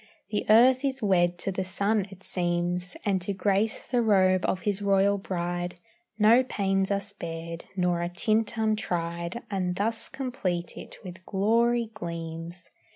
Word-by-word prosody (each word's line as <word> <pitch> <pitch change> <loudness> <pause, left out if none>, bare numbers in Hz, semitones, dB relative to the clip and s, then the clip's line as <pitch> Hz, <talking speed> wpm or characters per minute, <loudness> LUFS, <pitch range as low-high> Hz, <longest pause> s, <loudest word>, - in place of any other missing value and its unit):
The 210 - -1
earth 250 +4 +6
is 270 -3 -1
wed 175 -3 +3
to 195 - -1
the 190 0 -2
sun 200 +2 0
it 190 -1 -13
seems, 175 0 -2
And 195 -3 +1
to 195 +3 -2
grace 200 +3 +1
the 245 -2 0
robe 190 -4 +4
of 185 - -1
his 205 0 -1
royal 200 0 +3
bride 175 -1 -3 0.4
No 225 +4 +6
pains 195 -5 0
are 200 -1 +1
spared, 170 -4 -6
nor 180 -2 +1
a 175 - -1
tint 215 +5 0
untried, 175 -2 -1
And 180 -2 -1
thus 225 +3 -1
complete 190 -10 -3
it - - -9
with 185 0 -9
glory 230 +3 +2
gleams. 170 -1 -6
195 Hz, 155 wpm, -27 LUFS, 175-215 Hz, 0.4 s, earth